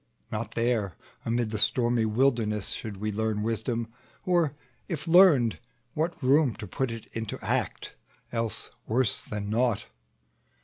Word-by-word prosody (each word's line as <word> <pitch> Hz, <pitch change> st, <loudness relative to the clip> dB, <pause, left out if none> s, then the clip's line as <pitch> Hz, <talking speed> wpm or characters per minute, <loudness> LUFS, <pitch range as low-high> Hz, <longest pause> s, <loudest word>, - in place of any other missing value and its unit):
Not 110 Hz, +1 st, -3 dB
there, 115 Hz, -6 st, +1 dB, 0.3 s
amid 115 Hz, -1 st, 0 dB
the 110 Hz, -, -2 dB
stormy 120 Hz, -2 st, +2 dB
wilderness, 110 Hz, -3 st, +1 dB
Should 105 Hz, -3 st, -3 dB
we 105 Hz, +2 st, -2 dB
learn 105 Hz, 0 st, -1 dB
wisdom; 115 Hz, +1 st, -2 dB, 0.3 s
or 170 Hz, -5 st, +2 dB, 0.3 s
if 165 Hz, -1 st, -4 dB
learned, 165 Hz, -, +6 dB, 0.3 s
what 160 Hz, 0 st, -2 dB
room 135 Hz, -1 st, +4 dB
To -, -, -7 dB
put 130 Hz, +7 st, -2 dB
it 115 Hz, -1 st, -6 dB
into 110 Hz, -1 st, -4 dB
act, -, -, -1 dB, 0.4 s
else 115 Hz, -2 st, -2 dB, 0.2 s
worse 120 Hz, -1 st, +2 dB
than 105 Hz, -1 st, -5 dB
naught? 115 Hz, -2 st, +1 dB
115 Hz, 135 wpm, -28 LUFS, 110-130 Hz, 0.4 s, learned